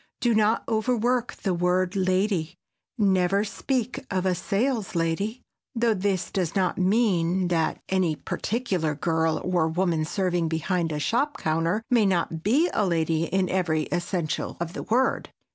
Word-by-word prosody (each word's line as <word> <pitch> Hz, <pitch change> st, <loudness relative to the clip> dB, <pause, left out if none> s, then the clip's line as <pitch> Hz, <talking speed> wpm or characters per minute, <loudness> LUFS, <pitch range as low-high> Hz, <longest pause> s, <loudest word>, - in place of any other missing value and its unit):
Do 240 Hz, -1 st, +2 dB
not 215 Hz, +1 st, +2 dB
overwork 240 Hz, +2 st, 0 dB
the 190 Hz, -, -2 dB
word 180 Hz, +2 st, +1 dB
"lady,"—never 190 Hz, +1 st, 0 dB
speak 250 Hz, +3 st, -2 dB
of 185 Hz, -1 st, -1 dB
a 185 Hz, -, +3 dB
"saleslady," 200 Hz, -1 st, -1 dB, 0.3 s
though 230 Hz, -1 st, +2 dB
this 190 Hz, -2 st, -1 dB
does 180 Hz, -3 st, -1 dB
not 185 Hz, -2 st, +1 dB
mean 185 Hz, -3 st, +2 dB
that 165 Hz, -2 st, 0 dB
any 185 Hz, -4 st, +1 dB
particular 185 Hz, -, -2 dB
girl 160 Hz, +1 st, 0 dB
or 175 Hz, -3 st, +1 dB
woman 165 Hz, -1 st, 0 dB
serving 175 Hz, 0 st, 0 dB
behind 165 Hz, +1 st, -1 dB
a 150 Hz, -, -2 dB
shop 245 Hz, -, 0 dB
counter 165 Hz, +7 st, 0 dB
may 230 Hz, -4 st, +4 dB
not 170 Hz, -3 st, 0 dB
be 265 Hz, -, +3 dB
a 215 Hz, -, +2 dB
lady 165 Hz, -3 st, +1 dB
in 190 Hz, +2 st, 0 dB
every 170 Hz, -4 st, +1 dB
essential 175 Hz, -2 st, -2 dB
of 170 Hz, 0 st, -4 dB
the -, -, -5 dB
word. 255 Hz, +4 st, 0 dB
185 Hz, 145 wpm, -25 LUFS, 165-215 Hz, 0.3 s, may